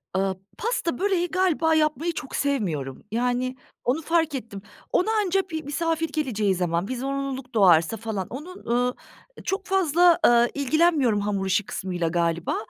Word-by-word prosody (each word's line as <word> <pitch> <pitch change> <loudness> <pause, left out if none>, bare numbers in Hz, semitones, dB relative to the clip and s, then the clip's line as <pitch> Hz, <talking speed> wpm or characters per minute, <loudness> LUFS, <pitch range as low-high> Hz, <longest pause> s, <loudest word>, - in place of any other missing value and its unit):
Iıı, 190 0 0 0.2
pasta, 395 - -1
böreği 380 -3 +1
galiba 335 -3 +2
yapmayı 310 +2 +1
çok 285 -3 -6
sevmiyorum. 175 - -2
Yani, 250 +2 0 0.3
onu 260 +6 0
fark 325 -2 +1
ettim. 215 -6 -6 0.3
Ona 400 +5 +2
anca 390 -3 +2
bir 315 -1 -4
misafir 325 +2 -1
geleceği 220 - 0
zaman, 175 +1 -1
bir 255 - -3
zorunluluk 270 -1 -4
doğarsa 180 0 +5
falan, 215 -4 -4
onun, 315 +9 -9
ııı, 245 +1 +1 0.5
çok 390 +1 -2
fazla, 355 -3 +4
ııı, 240 0 +5
ilgilenmiyorum 285 -5 +2
hamur 200 -1 -1
işi 200 +2 +1
kısmıyla 180 -4 -3
galiba. 170 0 0
260 Hz, 145 wpm, -25 LUFS, 205-325 Hz, 0.5 s, doğarsa